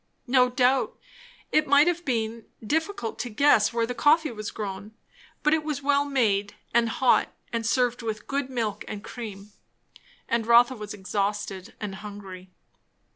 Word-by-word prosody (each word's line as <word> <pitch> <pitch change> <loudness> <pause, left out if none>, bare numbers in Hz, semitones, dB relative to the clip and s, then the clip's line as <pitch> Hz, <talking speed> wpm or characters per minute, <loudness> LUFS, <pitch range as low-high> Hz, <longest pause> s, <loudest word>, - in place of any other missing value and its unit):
No 250 -1 +4
doubt, 250 +1 +2 0.5
it 305 0 +3
might 285 +2 +6
have 350 0 0
been 230 -4 -2 0.2
difficult 315 - -2
to 245 - -3
guess 225 -2 +4
where 230 -1 0
the 250 - -4
coffee 300 +3 +3
was 215 -2 -5
grown; 205 0 -6 0.5
but 300 0 +4
it 320 -1 +1
was 295 -2 -3
well 285 0 +3
made 210 -8 +1 0.2
and 235 0 +3
hot 250 +2 +2 0.2
and 230 -1 -1
served 245 0 +1
with 220 -2 -4
good 280 -1 -2
milk 230 -5 -2
and 210 -1 -6
cream; 210 -4 -8 0.8
and 230 -1 0
Rotha 240 +2 +6
was 210 -2 -7
exhausted 200 0 -3
and 210 -3 -4
hungry. 195 -3 -9
235 Hz, 155 wpm, -26 LUFS, 210-270 Hz, 0.8 s, might